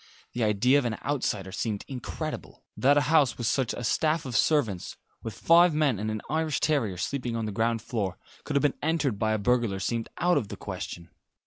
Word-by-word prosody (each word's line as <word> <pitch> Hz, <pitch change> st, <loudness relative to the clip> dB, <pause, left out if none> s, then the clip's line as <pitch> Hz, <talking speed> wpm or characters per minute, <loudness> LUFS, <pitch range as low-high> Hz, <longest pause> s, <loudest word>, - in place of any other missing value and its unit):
The 120 Hz, -, -1 dB
idea 110 Hz, +6 st, +4 dB
of 135 Hz, -, -3 dB
an 110 Hz, -3 st, -1 dB
outsider 105 Hz, -9 st, -1 dB
seemed 105 Hz, 0 st, -3 dB
incredible. 130 Hz, -4 st, -6 dB
That 140 Hz, +3 st, +4 dB
a -, -, +5 dB
house 145 Hz, -3 st, +3 dB
with 120 Hz, -, -3 dB
such 130 Hz, 0 st, +1 dB
a 120 Hz, -, -5 dB
staff 155 Hz, +7 st, +1 dB
of 125 Hz, -3 st, -5 dB
servants 110 Hz, -, +1 dB, 0.2 s
with 110 Hz, -3 st, -6 dB
five 170 Hz, -1 st, +5 dB
men 145 Hz, -9 st, +2 dB
and 110 Hz, +1 st, -2 dB
an 110 Hz, -1 st, -4 dB
Irish 155 Hz, +1 st, 0 dB
terrier 120 Hz, -, 0 dB
sleeping 125 Hz, +4 st, -3 dB
on 115 Hz, -1 st, -2 dB
the 105 Hz, -, -3 dB
ground 115 Hz, +2 st, 0 dB
floor 100 Hz, -7 st, -3 dB, 0.3 s
could -, -, -4 dB
have 140 Hz, -, +3 dB
been 145 Hz, -, +3 dB
entered 150 Hz, -9 st, 0 dB
by 110 Hz, 0 st, +1 dB
a -, -, +1 dB
burglar 115 Hz, -2 st, +1 dB
seemed 115 Hz, +3 st, -2 dB
out 175 Hz, -2 st, +3 dB
of 110 Hz, -, -6 dB
the -, -, -8 dB
question. 85 Hz, -1 st, -7 dB
120 Hz, 210 wpm, -27 LUFS, 110-145 Hz, 0.3 s, a